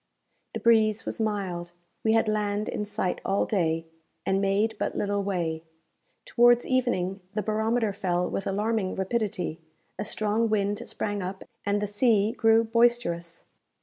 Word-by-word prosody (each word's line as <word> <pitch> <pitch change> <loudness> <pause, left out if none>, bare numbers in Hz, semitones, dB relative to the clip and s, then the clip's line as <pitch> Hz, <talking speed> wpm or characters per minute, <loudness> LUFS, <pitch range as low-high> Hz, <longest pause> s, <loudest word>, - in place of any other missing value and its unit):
The - - -1
breeze 220 -2 +3
was - - -3
mild; 190 -5 -2 0.3
we 220 - +3
had 225 0 +3
land 210 0 0
in 210 - -3
sight 190 -3 -2
all 195 +1 +1
day, 165 -5 0 0.4
and 195 0 +1
made 200 +3 +1
but - - -2
little 205 0 0
way. 170 -5 -2 0.6
Towards 240 0 +4
evening 205 -8 0 0.2
the 210 - 0
barometer 220 +1 0
fell 180 -2 0
with 195 - -3
alarming 210 0 0
rapidity, 190 -5 -2 0.4
a - - 0
strong 215 +2 0
wind 205 -1 0
sprang 205 -1 -3
up, 190 +1 -5 0.2
and 205 0 +2
the 210 - -1
sea 210 0 +2
grew 225 0 +4
boisterous. 230 -7 +1
205 Hz, 150 wpm, -27 LUFS, 190-220 Hz, 0.6 s, Towards